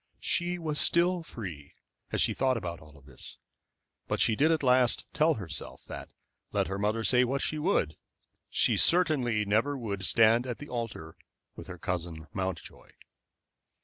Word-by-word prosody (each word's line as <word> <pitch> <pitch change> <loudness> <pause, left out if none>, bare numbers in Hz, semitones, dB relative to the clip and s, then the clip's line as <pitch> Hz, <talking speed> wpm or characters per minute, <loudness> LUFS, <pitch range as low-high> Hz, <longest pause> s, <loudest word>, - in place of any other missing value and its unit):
She 175 0 0
was 155 -3 -1
still 175 +1 +4
free, 90 - -9 0.4
as - - +1
she - - +3
thought 130 -2 +1
of 110 - -6
all 75 -4 -9
this, 65 -3 -7 0.7
but - - -1
she 110 - +3
did 155 +7 +3
at 160 -2 0
last 125 -2 +3
tell 155 +1 +3
herself 85 - -7
that, - - -8 0.4
let - - +1
her 95 +1 -4
mother 105 +2 0
say 125 +2 +4
what 135 +3 -1
she 155 - -2
would, 150 - +1 0.5
she - - +3
certainly 130 -11 +3
never 115 +8 +1
would 100 -6 -4
stand 115 +4 +4
at 120 - -4
the 145 - -10
altar 115 -10 -5 0.4
with - - -10
her 90 - -8
cousin 85 -2 -4
Mountjoy. 95 -4 -5
115 Hz, 160 wpm, -29 LUFS, 90-145 Hz, 0.7 s, still